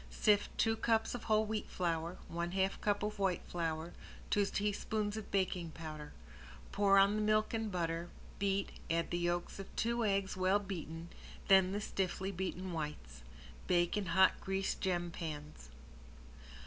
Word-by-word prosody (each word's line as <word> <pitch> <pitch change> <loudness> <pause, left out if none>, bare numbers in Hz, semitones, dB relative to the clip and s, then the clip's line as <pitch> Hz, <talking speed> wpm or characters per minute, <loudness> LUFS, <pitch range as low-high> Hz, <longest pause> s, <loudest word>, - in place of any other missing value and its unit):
Sift 205 - +2
two 225 -1 +3
cups 225 0 +1
of 245 - -5
whole 215 0 +3
wheat 215 0 -3
flour, 170 -1 -1
one 170 +1 -3
half 190 0 0
cup 205 -1 +1
of 210 0 -3
white 190 -3 +1
flour, 165 -1 -2 0.4
two 205 - +4
teaspoons 210 +1 -1
of 220 -2 -6
baking 185 -3 0
powder. 155 -2 -7 0.6
Pour 200 -1 +4
on 200 +1 +6
the 215 - 0
milk 215 +1 +2
and 225 -2 -1
butter, 170 -1 -2 0.3
beat, 195 0 0 0.2
add 165 0 0
the 175 - 0
yolks 175 +2 -1
of 195 - -6
two 235 +1 +1
eggs 195 -2 +1
well 185 +2 +3
beaten, 170 -4 -6 0.4
then 190 -1 +7
the 205 - -1
stiffly 190 -1 -2
beaten 185 0 -3
whites. 150 - -5 0.5
Bake 175 0 +3
in 205 -3 -1
hot 185 +2 +4
greased 195 0 -1
gem 175 -2 0
pans. 150 - -7
190 Hz, 160 wpm, -35 LUFS, 170-205 Hz, 0.6 s, then